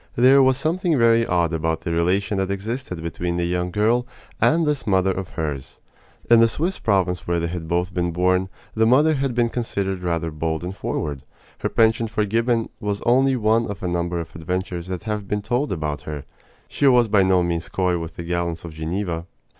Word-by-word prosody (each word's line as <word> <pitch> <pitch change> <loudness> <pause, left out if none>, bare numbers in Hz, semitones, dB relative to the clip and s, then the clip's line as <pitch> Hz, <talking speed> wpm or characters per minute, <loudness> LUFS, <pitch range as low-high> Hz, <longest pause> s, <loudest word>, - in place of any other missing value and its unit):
There 130 +3 +6
was 130 -1 +4
something 165 +2 0
very 115 -1 +4
odd 85 -2 +1
about 80 0 -1
the 85 - -3
relation 95 +4 +1
that 95 0 -1
existed 100 -3 -4
between 85 +1 -3
the 85 - 0
young 90 +1 -1
girl 115 +6 +1 0.3
and 165 +1 +4
this 150 -5 -1
mother 95 -1 +3
of 95 -1 -4
hers. 75 -5 -4 0.5
In 120 -1 +7
the 115 - +6
Swiss 170 +11 -2
province 90 -4 0
where 85 0 +1
they 85 - -1
had 85 -1 -5
both 90 +2 -1
been 85 -1 0
born, 90 +2 +1 0.2
the 110 0 +2
mother 145 +6 +5
had 135 -4 -1
been 120 -1 +2
considered 100 -6 -2
rather 85 -2 -1
bold 80 +1 -2
and 90 +2 -5
forward. 75 -7 -3 0.4
Her - - -1
penchant 115 0 +2
for 105 -1 0
Gibbon 115 +2 0
was 105 -1 -3
only 130 +2 +3
one 115 0 +2
of 100 -2 -7
a - - -1
number 85 0 -1
of 85 - -8
adventures 90 +1 -3
that 90 +1 -5
have 105 -2 -3
been 105 0 -2
told 125 +7 -1
about 75 -5 -3
her. 75 -2 -6 0.4
She 140 - +1
was 125 -3 +5
by 105 -2 +4
no 95 -1 +3
means 85 -1 -2
coy 90 -2 0
with 80 0 -7
the 85 - -6
gallants 85 -1 -2
of 85 - -8
Geneva. 85 +1 -3
95 Hz, 205 wpm, -22 LUFS, 85-115 Hz, 0.5 s, In